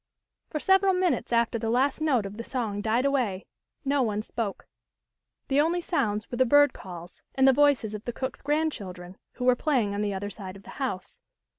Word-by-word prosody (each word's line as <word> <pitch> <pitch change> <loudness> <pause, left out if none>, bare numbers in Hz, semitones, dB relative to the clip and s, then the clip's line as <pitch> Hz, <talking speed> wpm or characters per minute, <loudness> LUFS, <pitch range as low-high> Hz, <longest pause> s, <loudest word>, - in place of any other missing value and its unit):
For 305 - -3
several 385 +3 +4
minutes 365 -7 0
after 235 0 +2
the 225 0 -2
last 265 +6 +1
note 265 -9 +2
of 195 +2 -7
the 230 - -5
song 225 -6 -3
died 225 +5 +1
away 245 -9 0 0.4
no 280 0 +2
one 215 -3 -1
spoke. 225 -3 -4 0.8
The 280 +1 +3
only 335 +3 +1
sounds 215 - -1
were 240 - -3
the - - +7
bird 290 +2 +5
calls, 175 -1 -10
and 265 0 +4
the 265 - +7
voices 280 -6 +3
of 210 +1 -7
the 240 - -2
cook's 260 +1 -5
grandchildren, 205 - -2 0.2
who 250 - -4
were 250 -1 +5
playing 245 -8 +1
on 200 - -2
the 205 -2 -1
other 205 +2 -4
side 190 -3 -8
of 195 - -13
the - - -11
house. 220 -9 -4
240 Hz, 200 wpm, -27 LUFS, 205-285 Hz, 0.8 s, the